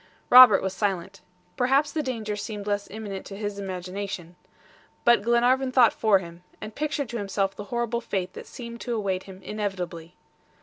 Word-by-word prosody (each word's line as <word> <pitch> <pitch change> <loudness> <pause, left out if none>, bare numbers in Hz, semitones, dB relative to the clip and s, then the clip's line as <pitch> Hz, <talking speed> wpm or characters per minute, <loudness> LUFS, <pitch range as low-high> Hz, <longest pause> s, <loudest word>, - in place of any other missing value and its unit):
Robert 250 -5 +9
was 190 -1 -2
silent. 195 -1 -2 0.3
Perhaps 270 +4 +2
the 315 - -1
danger 225 -6 -3
seemed 205 -1 -6
less 205 -1 -1
imminent 200 -2 -6
to 195 - -8
his 205 -1 -4
imagination. 185 -2 -5 0.7
But 235 -3 +5
Glenarvan 245 +4 +2
thought 250 -3 +5
for 215 -3 +3
him, 170 -2 -9 0.2
and 215 - -8
pictured 290 -2 -2
to 235 0 -4
himself 195 -1 -1
the 205 - -7
horrible 235 +2 -2
fate 190 -5 -3
that - - -10
seemed 235 -1 -9
to 240 -2 -3
await 195 -4 -2
him 190 -1 -12
inevitably. 180 -5 -5
205 Hz, 170 wpm, -26 LUFS, 190-235 Hz, 0.7 s, Robert